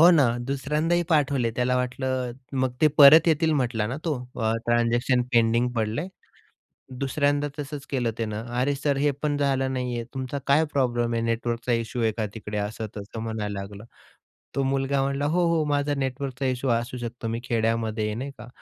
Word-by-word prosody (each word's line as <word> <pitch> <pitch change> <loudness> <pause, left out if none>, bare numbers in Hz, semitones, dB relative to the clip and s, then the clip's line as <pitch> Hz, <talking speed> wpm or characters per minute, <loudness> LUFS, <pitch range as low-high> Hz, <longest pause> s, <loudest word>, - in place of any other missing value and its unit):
हो 170 +2 +9
ना. 150 -7 +5 0.2
दुसऱ्यांदाही 150 +5 0
पाठवले. 140 -6 +2
त्याला 125 +1 +1
वाटलं, 125 0 -2 0.2
मग 130 -1 0
ते 155 - +6
परत 155 +4 +9
येतील, 160 0 +3
म्हटला 120 -6 0
ना, 125 +5 -3
तो 160 -3 +1 0.3
अ, 110 0 +2
ट्रान्झॅक्शन 120 +2 +2
पेंडिंग 115 +1 +3
पडलंय. 115 - -2 0.9
दुसऱ्यांदा 145 +1 +1
तसंच 145 -1 -6
केलं 125 -4 0
त्यानं. 110 -1 -3 0.2
"अरे 140 +3 +2
सर, 140 0 0
हे 145 +1 +2
पण 145 -1 +1
झालं 135 -2 +1
नाहीये. 125 -2 -2
तुमचा 130 +1 -4
काय 145 +3 +5
प्रॉब्लेम 120 -3 +1
आहे? 115 - 0
नेटवर्कचा 115 +1 -1
इश्यू 115 +1 -2
आहे 110 - +2
का 110 - 0
तिकडे?" 105 -1 -5
असं-तसं 105 +1 -5
म्हणायला 105 -3 -3
लागलं. 100 +1 -8 0.7
तो 135 - +1
मुलगा 135 0 +1
म्हणाला, 140 +1 -1
"हो, 170 +4 +2
हो, 155 - +2
माझा 145 0 0
नेटवर्कचा 135 0 -3
इश्यू 130 0 -1
असू 120 +2 -1
शकतो, 120 -1 -5
मी 115 +1 -2
खेड्यामध्ये 115 -1 0
आहे, 105 0 -2
नाही 135 +4 -4
का." 120 - -9
125 Hz, 175 wpm, -25 LUFS, 115-140 Hz, 0.9 s, हो